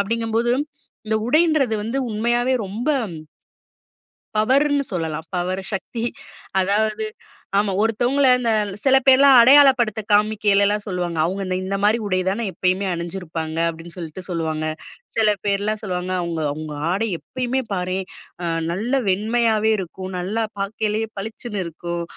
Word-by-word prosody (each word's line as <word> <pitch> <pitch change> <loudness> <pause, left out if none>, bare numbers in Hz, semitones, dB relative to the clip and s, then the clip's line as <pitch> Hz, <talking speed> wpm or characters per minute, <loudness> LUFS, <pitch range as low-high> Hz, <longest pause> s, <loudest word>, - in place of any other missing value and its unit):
அப்படீங்கும்போது, 230 +3 0 0.5
இந்த 220 0 +1
உடைன்றது 305 -5 +3
வந்து 245 +5 -2
உண்மையாவே 240 +4 +1
ரொம்ப 220 +8 -5 1.5
பவருன்னு 280 +5 +3
சொல்லலாம். 160 -2 -3
பவர் 185 +2 -2
சக்தி. 225 +4 -3 0.6
அதாவது 215 +3 0 0.5
ஆமா, 200 -1 +2
ஒருத்தவங்கள 245 +5 +2
இந்த 235 -2 0 0.3
சில 270 -1 +5
பேர்லாம் 270 0 +7
அடையாளப்படுத்த 260 -5 +6
காமிக்கைலலாம் 205 -1 +3
சொல்லுவாங்க, 175 -3 -2
"அவங்க 190 +4 -1
இந்த 185 0 -1
இந்த 195 +1 -2
மாதிரி 215 +3 +4
உடை 185 -1 +1
தானே 210 +5 0
எப்பயுமே 185 +2 0
அணிஞ்சிருப்பாங்க." 170 -2 -4
அப்பிடின்னு 165 +1 -7
சொல்லிட்டு 170 +1 -7
சொல்லுவாங்க, 160 -2 -2 0.5
சில 220 -2 +4 0.2
பேர்லாம் 205 +2 0
சொல்லுவாங்க 180 -1 -3
"அவங்க 170 -2 -3
அவங்க 155 0 -6 0.2
ஆடை 215 +5 0
எப்பயுமே 255 +1 -2
பாரேன் 185 +1 -2 0.7
நல்ல 215 +8 -3 0.2
வெண்மையாவே 220 +2 +2
இருக்கும். 190 +1 -6
நல்லா 205 +6 -1 0.2
பாக்கையிலேயே 215 +2 -1
பளிச்சின்னு 220 -1 -5
இருக்கும். 170 +1 -5
210 Hz, 120 wpm, -21 LUFS, 180-230 Hz, 1.5 s, பேர்லாம்